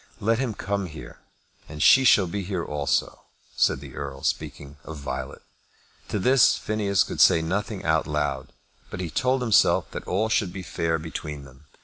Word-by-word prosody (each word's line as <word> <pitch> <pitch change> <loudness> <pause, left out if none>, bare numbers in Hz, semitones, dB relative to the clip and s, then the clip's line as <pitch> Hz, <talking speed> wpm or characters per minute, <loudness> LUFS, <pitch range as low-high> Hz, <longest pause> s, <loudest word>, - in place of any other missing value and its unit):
"Let 115 +3 +1
him 125 -5 -2
come 100 -2 -3
here, 65 -7 -11 0.5
and 75 0 -8
she 130 0 +7
shall 100 -5 +6
be 95 +3 -4
here 90 -2 -3
also," 75 -1 -1 0.3
said - - +2
the 70 -2 -11
Earl, 70 -1 -6
speaking 70 0 -4
of 80 - -8
Violet. 65 -2 -6 0.6
To - - -2
this 125 +1 +4
Phineas 105 -3 +1
could - - -3
say 80 - +6
nothing 100 +4 -3
out 80 -1 +1
loud, 75 -3 -2 0.4
but - - -7
he 90 -3 -4
told 130 0 +1
himself 105 -5 +3
that - - -7
all 105 +5 0
should 105 -4 0
be 95 0 -7
fair 80 0 -1
between 75 -2 -7
them. 65 +2 -17
85 Hz, 175 wpm, -25 LUFS, 75-105 Hz, 0.6 s, she